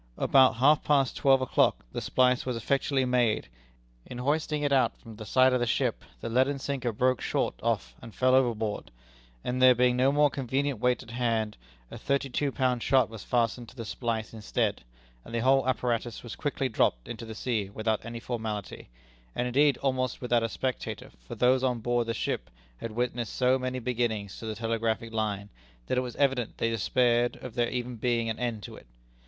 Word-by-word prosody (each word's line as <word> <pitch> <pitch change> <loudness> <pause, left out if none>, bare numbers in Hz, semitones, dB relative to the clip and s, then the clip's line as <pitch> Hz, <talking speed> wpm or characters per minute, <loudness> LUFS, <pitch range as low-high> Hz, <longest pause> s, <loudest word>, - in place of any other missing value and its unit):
About 130 -3 +5
half 145 +5 +4
past 140 -3 +2
twelve 135 -1 +4
o'clock 130 - +2
the - - -4
splice 125 -1 +2
was 125 -2 -2
effectually 135 +3 +1
made. 125 -3 +1 0.6
In 125 - -8
hoisting 150 +3 0
it 145 -1 +1
out 130 -2 +2
from 115 -3 -12
the 110 -1 -8
side 130 +4 +4
of 125 - +2
the 120 - 0
ship - - 0 0.2
the - - -4
leaden 130 +4 +2
sinker 135 -3 -2
broke 125 +3 +1
short - - 0
off 60 -1 -1
and 115 - -11
fell 130 0 +3
overboard; 115 -5 +1 0.5
and 125 +1 -2
there 130 -1 +8
being 125 0 +3
no 130 +2 +3
more 145 0 +3
convenient 135 -1 -1
weight 125 +2 +1
at 120 - -12
hand, 115 -3 -1 0.4
a - - -8
thirty 140 -1 -1
two 140 +2 0
pound 125 -3 0
shot 130 -2 +3
was 110 -3 -8
fastened 120 0 0
to - - -17
the 115 -3 -6
splice 115 0 -3
instead, 110 - -1 0.4
and 115 - -8
the 115 - 0
whole 135 0 +4
apparatus 120 -2 -1
was 120 - -7
quickly 145 -2 -1
dropped 65 - +1
into 115 0 -6
the 110 -1 -7
sea 110 -4 -2
without 110 +1 -1
any 115 +1 -6
formality, 110 - -5 0.5
and 125 - 0
indeed 140 +2 +3
almost 130 -2 0
without 120 -2 +1
a 115 - -1
spectator, 130 +3 -4 0.2
for - - -6
those 130 +1 +3
on 125 -2 +1
board 120 +1 0
the 115 - -1
ship - - -3 0.3
had 115 - -6
witnessed 120 0 -2
so 130 +1 +3
many 130 0 -3
beginnings 115 -5 -2
to 110 - -7
the 110 - -3
telegraphic 115 0 -2
line, 105 -2 -2 0.4
that 125 - 0
it - - +1
was 125 -2 -6
evident 135 -5 0
they 115 - 0
despaired 120 +2 +2
of 125 - -7
there 120 -1 +1
ever 125 0 -3
being 115 -1 0
an 110 - -6
end 120 -4 -2
to - - -8
it. - - -15
125 Hz, 200 wpm, -28 LUFS, 115-130 Hz, 0.6 s, there